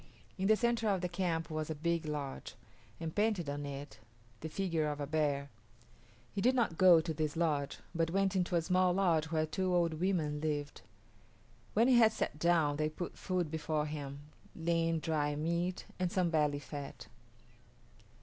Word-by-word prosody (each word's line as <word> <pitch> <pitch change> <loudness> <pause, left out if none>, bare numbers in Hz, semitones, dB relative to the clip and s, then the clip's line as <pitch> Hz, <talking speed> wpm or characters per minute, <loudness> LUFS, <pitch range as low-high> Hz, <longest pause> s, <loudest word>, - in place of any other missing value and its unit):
In 190 -1 -1
the 220 - +6
centre 235 -1 +1
of 195 -3 +1
the 180 - 0
camp 170 -3 -2
was 155 0 -3
a 160 - -2
big 165 +1 -1
lodge, 145 -3 -5 0.4
and 165 -1 -4
painted 210 -6 +1
on 145 0 -3
it 140 +1 -7 0.4
the 160 - -5
figure 165 -3 -1
of 150 -1 -3
a 145 - -2
bear. 140 -2 0 0.8
He 200 - -2
did 255 +4 +4
not 230 -9 +1
go 175 -2 +7
to 160 0 -3
this 155 -1 -2
lodge, 150 -4 0 0.2
but 165 -1 +1
went 195 +2 +1
into 180 -1 +1
a 170 - +2
small 180 +1 +3
lodge 175 -5 +2
where 160 -1 0
two 185 +4 -1
old 170 -2 +2
women 160 -5 0
lived. 145 -2 -3 0.9
When 230 +3 +5
he 255 -2 +6
had 220 -2 +6
sat 150 - -3
down 160 -3 +3
they 155 0 +1
put 175 +3 -6
food 180 -5 -2
before 155 -1 -1
him 145 -2 -6 0.3
lean 165 0 +1
dried 150 -2 0
meat 170 +4 -1
and 180 -1 0
some 185 -4 +1
belly 150 -3 +2
fat. 145 0 -7
165 Hz, 180 wpm, -33 LUFS, 150-185 Hz, 0.9 s, go